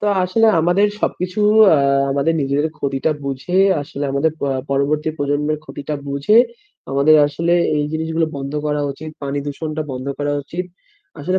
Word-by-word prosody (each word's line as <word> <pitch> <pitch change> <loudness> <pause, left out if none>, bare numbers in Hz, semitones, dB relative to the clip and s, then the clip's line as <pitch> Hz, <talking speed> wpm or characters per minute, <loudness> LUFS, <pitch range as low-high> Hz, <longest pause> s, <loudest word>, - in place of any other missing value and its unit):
তো 210 - -2 0.2
আসলে 225 +5 +2
আমাদের 175 +5 +3
সবকিছু 180 +3 -2 0.4
আ - - +3 0.3
আমাদের 145 +4 +1
নিজেদের 140 +2 0
ক্ষতিটা 140 +2 -1
বুঝে, 135 +7 -2 0.2
আসলে 145 0 -6
আমাদের 145 +3 +1
প - - -8 0.3
পরবর্তী 150 +3 0
প্রজন্মের 145 +1 -1
ক্ষতিটা 145 +2 -6
বুঝে 140 +10 +2 0.5
আমাদের 140 +3 +5
আসলে 165 +4 0 0.2
এই 150 - 0
জিনিসগুলা 160 0 -1
বন্ধ 140 +1 -5
করা 150 0 0
উচিত। 155 +3 -9
পানি 140 0 -2
দূষণটা 155 +2 -4
বন্ধ 130 +1 -6
করা 145 0 -1
উচিত। 175 +5 -5 0.6
আসলে 185 +5 0
150 Hz, 155 wpm, -19 LUFS, 140-160 Hz, 0.6 s, আমাদের